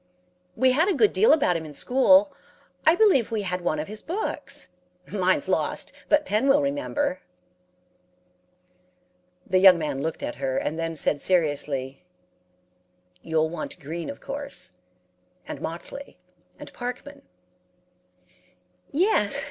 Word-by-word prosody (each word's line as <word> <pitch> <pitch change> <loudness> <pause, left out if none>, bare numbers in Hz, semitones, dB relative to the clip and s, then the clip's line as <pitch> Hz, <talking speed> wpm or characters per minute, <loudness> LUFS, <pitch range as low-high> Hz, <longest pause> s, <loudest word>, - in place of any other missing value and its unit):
"'We 260 0 +3
had 320 +9 +3
a 385 - +1
good 415 +8 +3
deal 450 - +5
about 275 - +3
him 165 - -3
in 150 -2 -10
school. 280 - +4 0.5
I 320 - +7
believe 365 - +4
we 220 -3 -2
had 180 -1 -3
one 165 -3 -1
of 150 - -4
his 215 +1 -7
books. 360 - -4 0.4
Mine's 185 -2 +1
lost, - - -1 0.2
but 300 0 +3
Pen 220 +2 +1
will 275 +1 +5
remember.' 285 0 -1 2.3
"The 185 - +2
young 185 -2 +8
man 145 -4 -3
looked 160 +2 -4
at - - -4
her, 135 -1 -2
and 160 - -2
then 165 0 -3
said 145 -1 +1
seriously, 145 -6 0 1.2
'You'll 160 -1 0
want 170 - -6
Green, 165 +4 -6
of 280 - -8
course, 280 - -5 0.8
and - - -7
Motley, 175 +12 -7 0.4
and - - -11
Parkman.' 250 +4 -7 1.7
"'Yes. 375 +9 +2
205 Hz, 130 wpm, -25 LUFS, -, 2.3 s, young